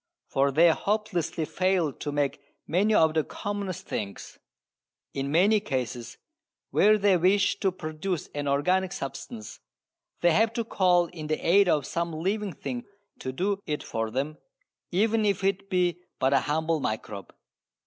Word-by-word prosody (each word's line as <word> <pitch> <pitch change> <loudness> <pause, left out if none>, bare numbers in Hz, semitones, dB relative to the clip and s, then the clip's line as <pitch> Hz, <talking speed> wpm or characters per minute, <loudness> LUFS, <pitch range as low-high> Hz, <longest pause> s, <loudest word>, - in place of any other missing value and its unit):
For 140 +1 +1
they 165 +5 +5
hopelessly 195 -5 -1
fail 185 -4 +1
to 145 - -5
make 145 0 -1 0.2
many 195 +6 +2
of 160 -4 +4
the 160 -1 +2
commonest 200 -1 -5
things. 100 -2 -6 0.7
In 135 0 -2
many 200 +7 +4
cases 125 - -4 0.5
where 215 +1 +5
they 200 -2 +4
wish 190 +3 +3
to 190 - +2
produce 165 0 -4
an 145 -1 -3
organic 180 +7 +1
substance 140 - -7 0.6
they 175 - +5
have 220 +6 +3
to 230 - -1
call 180 -5 +3
in 160 -2 -8
the 155 0 0
aid 195 +2 +5
of 150 -5 +2
some 170 +3 -2
living 195 +4 -2
thing 130 -4 -5 0.3
to 130 - -4
do 195 +8 -1
it 150 -1 -2
for 115 0 -3
them, 140 +6 -3 0.5
even 220 +4 +2
if 200 -2 +1
it 195 0 0
be 180 -2 +1 0.2
but 130 +1 +2
a 135 - +5
humble 160 +4 0
microbe. 110 -5 -4
170 Hz, 155 wpm, -27 LUFS, 145-195 Hz, 0.7 s, they